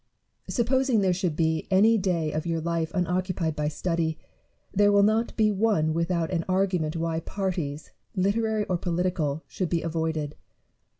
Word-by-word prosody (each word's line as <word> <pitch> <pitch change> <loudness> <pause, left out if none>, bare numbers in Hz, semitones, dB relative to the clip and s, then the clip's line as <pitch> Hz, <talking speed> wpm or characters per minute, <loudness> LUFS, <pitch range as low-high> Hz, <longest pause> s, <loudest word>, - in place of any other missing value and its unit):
Supposing 255 -1 +2
there 185 -2 +3
should 175 -3 -1
be 160 -1 0
any 205 +4 +5
day 180 -6 0
of 155 +3 -3
your 165 -1 0
life 165 0 -1
unoccupied 180 -2 -1
by 150 -1 -1
study, 160 0 -1 0.6
there 205 +1 +4
will 200 0 +5
not 220 +3 +1
be 215 -1 +4
one 195 -7 +2
without 170 0 0
an 170 -2 0
argument 185 -4 +1
why 165 0 -1
parties, 170 -5 -3 0.2
literary 215 +3 +1
or 180 -2 -1
political, 170 -4 -1
should 185 -3 -3
be 170 -2 0
avoided. 160 -2 -2
175 Hz, 155 wpm, -26 LUFS, 160-200 Hz, 0.6 s, any